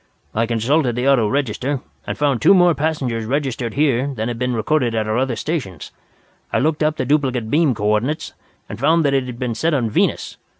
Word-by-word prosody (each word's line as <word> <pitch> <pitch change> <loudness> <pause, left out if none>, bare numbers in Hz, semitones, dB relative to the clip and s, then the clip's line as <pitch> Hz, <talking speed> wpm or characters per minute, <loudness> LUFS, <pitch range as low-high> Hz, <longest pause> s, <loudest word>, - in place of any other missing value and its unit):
I 115 +1 0
consulted 120 +3 +1
the 125 +2 -1
auto 130 -6 +4
register, 135 +2 -1 0.3
and - - -3
found 140 -6 +1
two 195 - +6
more 175 -2 +5
passengers 135 -7 -2
registered 130 -3 -2
here 140 -3 +2
than 110 +1 -2
had 120 -1 -5
been 125 -1 -1
recorded 120 0 0
at 110 -1 -1
our 110 - 0
other 130 -2 0
stations. 110 - -4 0.6
I - - +1
looked 155 +2 0
up 155 0 +1
the - - -1
duplicate 130 -5 0
beam 150 -5 +3
coordinates, 105 +9 -1 0.3
and 105 - -8
found 160 +4 +3
that 140 - +2
it 135 -2 +1
had 125 -2 -7
been 125 -1 -2
set 155 +8 0
on 115 -5 -1
Venus. - - 0
130 Hz, 205 wpm, -20 LUFS, 115-150 Hz, 0.6 s, two